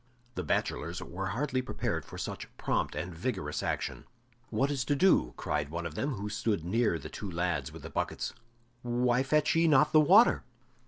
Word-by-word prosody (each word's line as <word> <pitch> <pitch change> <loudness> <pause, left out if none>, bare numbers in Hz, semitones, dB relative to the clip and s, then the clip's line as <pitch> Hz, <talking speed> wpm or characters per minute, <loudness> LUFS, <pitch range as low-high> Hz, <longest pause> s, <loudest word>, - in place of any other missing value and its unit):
The - - -3
bachelors 85 +1 -1
were 95 +2 -5
hardly 130 +5 -1
prepared 125 - -3
for - - -10
such - - -5
prompt - - -1
and 90 0 -4
vigorous 85 - -3
action. - - -3 0.4
"What 135 +6 +1
is 135 -2 -1
to 145 - +1
do?" 140 - +3
cried 75 -1 -1
one 85 +2 -4
of 85 - -4
them, 140 - -1
who 105 0 -4
stood 105 -4 -1
near 110 -1 +2
the 75 - -8
two 100 - -6
lads 85 0 -1
with - - -11
the - - -7
buckets. - - -2 0.5
"Why 120 +1 +2
fetch 150 +2 +2
ye 165 0 +4
not 150 -1 +5
the 155 - +8
water?" 195 +10 +6
115 Hz, 190 wpm, -30 LUFS, 85-140 Hz, 0.5 s, the